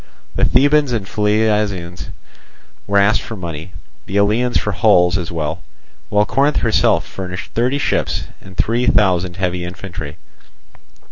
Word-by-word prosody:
The - - +2
Thebans 145 +1 +3
and 110 -4 -2
Phliasians 105 -4 0 0.8
were 100 0 +1
asked 100 +3 +4
for 115 - -7
money, 85 -2 -7 0.4
the 95 - -2
Eleans 110 +5 +2
for 105 - -1
hulls 90 -3 +4
as 90 -3 -3
well; 80 +1 -3 0.5
while 105 0 +3
Corinth 140 +7 +1
herself - - +2
furnished 90 -1 -7
thirty 125 +4 0
ships - - -1 0.2
and 95 -1 -14
three 120 +2 +1
thousand 90 -4 +2
heavy 90 -2 -1
infantry. 85 -4 -7
100 Hz, 135 wpm, -18 LUFS, 90-110 Hz, 0.8 s, asked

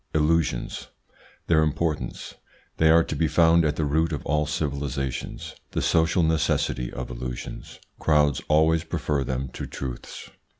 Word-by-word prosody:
ILLUSIONS. 80 -5 0 0.6
Their 80 -2 +4
importance 75 -4 -2 0.4
They 80 - +4
are 85 +1 +6
to 80 - -4
be 80 +2 +1
found 85 +1 +4
at 75 -2 +1
the 75 - 0
root 80 +3 +1
of 75 - -4
all 75 +1 +1
civilisations 70 -3 -3 0.2
The - - 0
social 85 +2 +3
necessity 80 -6 0
of 65 0 -6
illusions 60 0 -7 0.2
Crowds 75 -3 +3
always 80 +1 +3
prefer 75 -4 -1
them 65 0 -3
to - - -7
truths. 65 -3 -7
75 Hz, 140 wpm, -25 LUFS, 70-80 Hz, 0.6 s, are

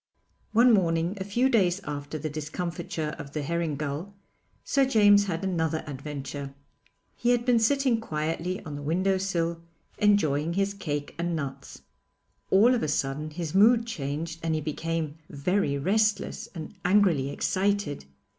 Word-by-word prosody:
One 235 +2 +6
morning, 170 -1 +2
a - - 0
few 235 +7 +1
days 195 -7 +2
after 145 0 -5
the 155 +1 -4
discomfiture 155 +1 -4
of 140 0 -8
the 150 - -2
herring 165 0 -1
gull, 150 +7 -4 0.5
Sir 275 - +2
James 205 -5 +5
had 170 0 -2
another 160 -4 -1
adventure. 140 -1 -6 0.6
He 240 - 0
had 240 -1 +2
been 245 -2 +4
sitting 250 0 +2
quietly 165 +1 -3
on 150 -2 -6
the 145 - -6
window 185 +6 +1
sill 170 -3 -1 0.4
enjoying 165 -7 +2
his 195 +2 0
cake 145 -7 -4
and 170 0 -1
nuts. 140 -4 -6 0.7
All 220 +6 +6
of 245 - +1
a - - 0
sudden 145 +1 -1
his 160 0 -5
mood 225 +4 +5
changed 165 -4 -4
and 165 -1 0
he 155 - -1
became 160 0 -3
very 145 0 0
restless 210 +7 0
and 160 +2 -7
angrily 180 -8 +3
excited. 190 - -1
170 Hz, 150 wpm, -27 LUFS, 150-200 Hz, 0.7 s, One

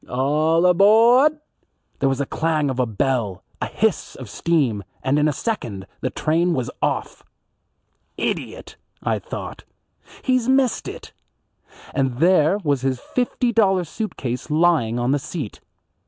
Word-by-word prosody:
All 150 +6 +2
abawd." 230 - +5 0.6
There 135 - +2
was 135 - 0
the 140 - -1
clang 155 -2 0
of 130 - -4
a 125 - +2
bell, 110 -3 -1 0.2
a - - -1
hiss - - -1
of - - -9
steam, 135 -12 0 0.2
and 135 +3 +2
in 150 - +3
a - - +2
second 120 - -4
the 130 - -2
train 165 +4 +1
was 125 -2 -2
off. - - -2 1.0
"Idiot," - - -4 0.3
I - - 0
thought, - - -7 0.6
"he's 255 -2 +1
missed 265 -2 +2
it;" - - -9 0.8
and 135 -3 0
there 170 +2 +4
was 140 -4 +1
his 130 -1 -1
fifty 245 - -1
dollar 195 -5 +3
suit 215 +6 -5
case 125 +2 -4
lying 150 -8 +2
on 120 +2 0
the 145 - +2
seat. 140 - -6
150 Hz, 145 wpm, -22 LUFS, 130-190 Hz, 1.0 s, abawd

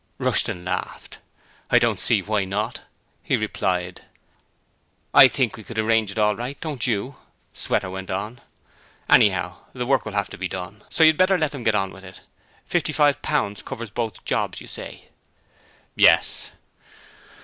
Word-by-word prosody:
Rushton 90 0 0
laughed. 90 - -5 0.5
'I - - +5
don't - - +2
see - - +1
why 105 -1 0
not,' 105 +5 -3 0.4
he - - 0
replied. 90 -1 -2 1.1
'I 130 - +10
think 130 -3 0
we 110 - -11
could 115 +2 -9
arrange 110 -1 +2
it 100 - -8
all 105 -1 +3
right, 125 +5 -6
don't 145 -8 -3
you?' 125 +4 -2 0.4
Sweater - - -1
went 95 0 -7
on. 105 +6 -4 0.7
'Anyhow, 90 -3 +4 0.2
the 125 -1 -3
work 130 -3 +2
will 105 - -7
have 100 -2 -1
to - - -9
be 95 - -2
done, 95 +3 -7
so 165 - +3
you'd 155 -1 +6
better 185 +1 +4
let 155 -3 -1
'em 135 -4 -6
get 110 -2 +2
on 95 -2 0
with 95 - -13
it. 95 -1 -12 0.5
£55.0.0. 145 -7 +1
covers 115 -2 -7
both 115 -2 -4
jobs, - - -1
you - - -11
say?' - - -9 0.9
'Yes.' - - +4
110 Hz, 160 wpm, -23 LUFS, 95-125 Hz, 1.1 s, I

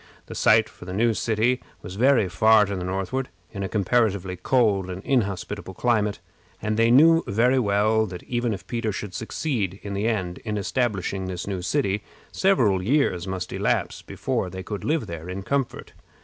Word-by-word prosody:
The - - -9
site 110 0 +4
for - - -14
the 90 - -6
new 115 +2 +3
city 115 +3 +1 0.2
was 90 - -7
very 120 0 +3
far 110 +4 +5
to 100 0 -4
the 90 - -4
northward, 95 +8 -2 0.2
in 100 - -6
a 95 - -2
comparatively 100 -3 +1
cold 100 -1 +1
and 95 +1 -6
inhospitable 100 -5 -2
climate; 105 -2 +1 0.4
and 110 0 -1
they 115 +1 +3
knew 165 +7 +6
very 120 +6 +3
well 110 0 +2
that, 90 -2 -8
even 120 -1 -1
if 100 -3 -5
Peter 115 -2 -2
should 100 -1 -6
succeed, 110 - -2
in 100 - -5
the 100 +3 -1
end, 95 -6 -2
in 105 -2 -4
establishing 100 -4 -1
his 90 -2 -4
new 95 -3 -3
city, 100 0 0 0.3
several 120 - +2
years 100 - +1
must 95 -2 -4
elapse - - -1
before 90 - -3
they 95 +1 -7
could 105 0 -5
live 155 0 0
there 85 +1 -7
in 95 +1 -5
comfort. 140 +3 -2
105 Hz, 180 wpm, -24 LUFS, 95-120 Hz, 0.4 s, knew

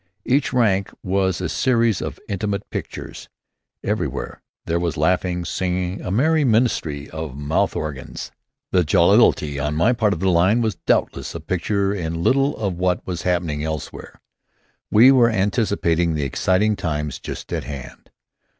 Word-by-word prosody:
Each 140 +2 +2
rank 105 -6 +2
was 95 -2 0
a 90 - -1
series 115 +1 +1
of - - -5
intimate 100 +1 -3
pictures. - - -7 0.5
Everywhere - - -3 0.2
there 85 +1 0
was 85 -4 -2
laughing, 90 +2 0
singing, 90 +1 -2
a - - -5
merry 155 - +2
minstrelsy 110 - +1
of 80 -4 -6
mouth 75 +2 0
organs. 75 -5 -5 0.4
The 90 - +3
jollity 75 -1 +3
in 75 +1 -1
my 85 +9 +3
own 125 - +2
part 105 -3 +2
of 80 - -5
the 95 +1 +2
line 90 +7 +3
was 110 -2 0
doubtless - - 0
a - - -4
picture 95 +4 -1
in 85 -3 -3
little 135 +5 +2
of 95 -5 -3
what 90 -1 0
was 90 -3 -4
happening 85 -5 -1
elsewhere. 80 -1 -6 0.7
We 120 +5 +7
were 125 -3 +5
anticipating 95 -6 +1
the 75 - -1
exciting 95 +9 +1
times 75 -5 -3
just - - -7
at - - -3
hand. 70 -4 -9
90 Hz, 155 wpm, -21 LUFS, 80-105 Hz, 0.7 s, We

